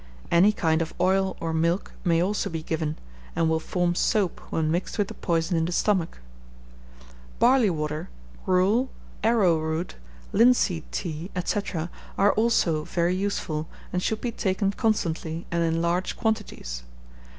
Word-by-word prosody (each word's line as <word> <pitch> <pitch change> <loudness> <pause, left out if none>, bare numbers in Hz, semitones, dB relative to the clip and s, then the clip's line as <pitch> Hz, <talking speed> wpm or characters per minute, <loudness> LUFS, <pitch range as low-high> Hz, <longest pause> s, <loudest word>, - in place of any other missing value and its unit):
Any 180 +5 +6
kind 160 -5 +1
of 165 - -4
oil 190 +1 +2
or 165 -2 -2
milk 170 +4 0
may 170 -2 +3
also 205 +3 -1
be 160 -1 -4
given, 155 -1 -2 0.4
and 165 -1 +2
will 160 0 +2
form 175 +1 0
soap 190 +1 +1
when 155 -1 0
mixed 175 +6 -2
with 205 -2 +1
the - - -6
poison 170 0 0
in 160 - +1
the 175 - -2
stomach. 180 -2 +1 1.2
Barley 250 -4 +5
water, 150 -2 -3 0.3
gruel, 200 +8 +3 0.3
arrowroot, 170 -7 +2 0.4
linseed 220 -8 +3
tea, 165 0 -4 0.2
&c., 205 - +1 0.6
are 200 +1 +5
also 200 -9 +2
very 175 +2 0
useful, 175 -5 -2 0.3
and 180 - 0
should 220 +3 -1
be 240 - -1
taken 195 -1 0
constantly, 170 -6 -1
and 170 0 +1
in 165 0 +1
large 175 +2 0
quantities. 210 - -2
175 Hz, 145 wpm, -26 LUFS, 160-200 Hz, 1.2 s, Any